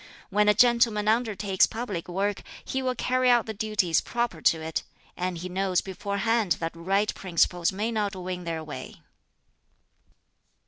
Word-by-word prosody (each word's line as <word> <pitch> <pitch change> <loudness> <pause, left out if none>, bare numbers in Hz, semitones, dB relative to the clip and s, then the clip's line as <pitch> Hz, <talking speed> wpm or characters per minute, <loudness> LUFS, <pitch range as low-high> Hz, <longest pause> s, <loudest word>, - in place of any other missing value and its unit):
When 210 +1 +4
a 210 - +5
gentleman 235 -2 +4
undertakes 215 -4 +2
public 215 -7 -5
work, 195 +3 -1 0.2
he 265 - -2
will 255 -1 -1
carry 255 +1 +1
out 240 -2 +4
the 220 - -4
duties 205 -6 +1
proper 235 -9 -2
to 160 - +3
it; 160 0 -3 0.3
and 180 -1 -2
he 175 +2 -5
knows 185 0 0
beforehand 200 +1 0
that 165 0 -4
right 195 +5 0
principles 175 -1 +1
may 210 +4 -2
not 210 -3 -1
win 180 -1 -5
their 165 -2 -3
way." 150 -1 -9
200 Hz, 150 wpm, -27 LUFS, 180-225 Hz, 0.3 s, a